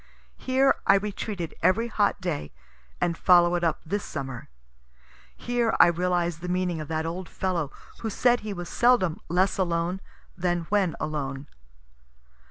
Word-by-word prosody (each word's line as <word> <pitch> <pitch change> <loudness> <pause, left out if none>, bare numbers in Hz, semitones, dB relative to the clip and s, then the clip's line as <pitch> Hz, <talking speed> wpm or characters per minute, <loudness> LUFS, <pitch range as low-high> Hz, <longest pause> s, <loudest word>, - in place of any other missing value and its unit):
Here 265 +1 +3
I 195 - +7
retreated 200 -3 -3
every 225 +6 +3
hot 205 -3 +1
day, 170 - -3 0.5
and 170 -1 0
follow 175 0 +5
it 175 0 0
up 165 -2 0
this 200 +5 -2
summer. 135 -4 -6 0.9
Here 240 -2 0
I - - +10
realize 175 -1 0
the 180 +1 -6
meaning 180 -2 -1
of 155 - -7
that 160 0 -2
old 175 +2 -5
fellow 170 -6 -2 0.3
who 225 - -3
said 245 +3 +3
he 215 - -6
was 175 -3 -5
seldom 240 -9 +2
less 185 +3 +1
alone 175 +1 0 0.3
than 175 -1 0
when 200 -5 +2
alone. 140 -2 -3
180 Hz, 150 wpm, -26 LUFS, 165-200 Hz, 0.9 s, I